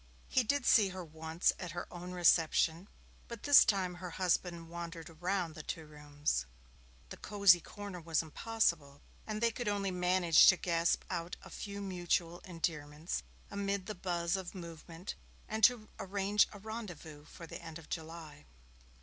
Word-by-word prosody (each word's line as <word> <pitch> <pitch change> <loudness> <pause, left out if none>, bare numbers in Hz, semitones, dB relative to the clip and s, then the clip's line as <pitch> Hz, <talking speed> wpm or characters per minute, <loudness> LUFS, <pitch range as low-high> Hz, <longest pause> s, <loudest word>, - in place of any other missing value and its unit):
He 260 - +3
did 270 +3 0
see 210 -5 +6
her 185 -1 -6
once 160 +2 0
at 175 -4 -5
her 175 - -4
own 180 +1 -7
reception, 170 0 +3 0.4
but 235 -3 -8
this 285 -2 +9
time 190 -3 +1
her 180 0 -7
husband 175 -1 -1
wandered 170 0 -7
about 175 +1 -2
the 155 - -7
two 160 +1 -5
rooms. 145 - -2 0.6
The - - -8
cosy 200 -4 +5
corner 200 -2 -8
was 165 0 0
impossible, 160 -5 -1 0.2
and 215 0 -3
they 235 0 +3
could 240 0 -5
only 200 -2 0
manage 180 -2 +5
to 190 - +7
gasp 170 -1 +1
out 170 +1 -3
a - - -12
few 200 0 -6
mutual 175 -2 -1
endearments 160 -2 -3 0.3
amid 200 -1 -2
the 215 - -4
buzz 175 -2 -1
and 190 0 -5
movement, 170 0 -8 0.3
and 220 +1 -4
to 235 -4 +2
arrange 200 +1 +2
a 205 - -10
rendezvous 190 -9 -8
for 165 - -11
the - - -8
end 165 -1 -8
of 165 - -13
July. 160 - -7
175 Hz, 160 wpm, -34 LUFS, 165-200 Hz, 0.6 s, this